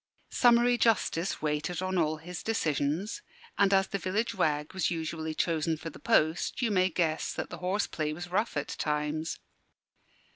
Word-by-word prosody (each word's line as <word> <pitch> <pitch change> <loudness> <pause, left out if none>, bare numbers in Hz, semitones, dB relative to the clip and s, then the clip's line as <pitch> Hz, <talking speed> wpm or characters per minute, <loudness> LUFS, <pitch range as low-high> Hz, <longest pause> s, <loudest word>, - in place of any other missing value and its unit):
Summary 240 0 +4
justice 195 -8 +1
waited 150 +3 -1
on 185 0 -1
all 155 -3 +1
his 175 +2 -7
decisions; 165 - -1 0.3
and 200 -2 +3
as 195 -1 +4
the 200 - -3
village 200 +6 -1
wag 150 -1 0
was 190 -2 +1
usually 160 -1 -3
chosen 160 -1 0
for 165 +1 -7
the - - -13
post, 160 +3 +2
you 235 -4 +1
may 185 -2 +3
guess 160 -2 0
that - - -5
the - - -7
horse 190 +3 0
play 155 -1 -2
was 175 +3 -6
rough 210 -1 0
at 145 - -2
times. 150 +1 -2
170 Hz, 170 wpm, -29 LUFS, 155-195 Hz, 0.3 s, Summary